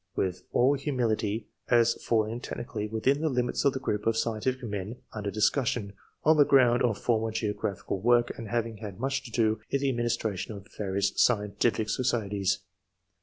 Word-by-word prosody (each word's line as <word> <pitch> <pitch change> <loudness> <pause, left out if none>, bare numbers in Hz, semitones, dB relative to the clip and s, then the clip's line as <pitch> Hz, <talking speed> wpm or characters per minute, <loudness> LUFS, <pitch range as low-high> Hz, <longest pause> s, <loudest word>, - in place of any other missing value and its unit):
with 90 -1 -2
all 130 +3 +4
humility, 115 -6 -1 0.2
as 115 -1 +5
falling 110 0 +1
technically 110 -4 -5
within 110 +7 +1
the 160 - +1
limits 125 -2 0
of 140 -2 +3
the 130 - -3
group 105 -4 -2
of 115 0 +2
scientific 120 +3 -1
men 105 0 -4 0.2
un 105 - -5
der 100 - -2
discussion, 110 0 0 0.3
on 155 +1 +5
the 145 - +8
ground 125 -4 +4
of 115 -4 +2
former 115 -2 +1
geo 110 -1 -1
graphical 100 -1 -3
work, 120 +3 +3
and 115 - -7
having 115 0 -2
had 100 -2 -8
much 135 +2 -1
to 130 - -10
do 110 -2 +1
in 140 - +1
the 140 0 +1
administration 120 -5 -2
of 100 0 -10
various 100 -1 0
scientific 105 0 +2
societies. 105 -6 0
115 Hz, 175 wpm, -28 LUFS, 105-125 Hz, 0.3 s, the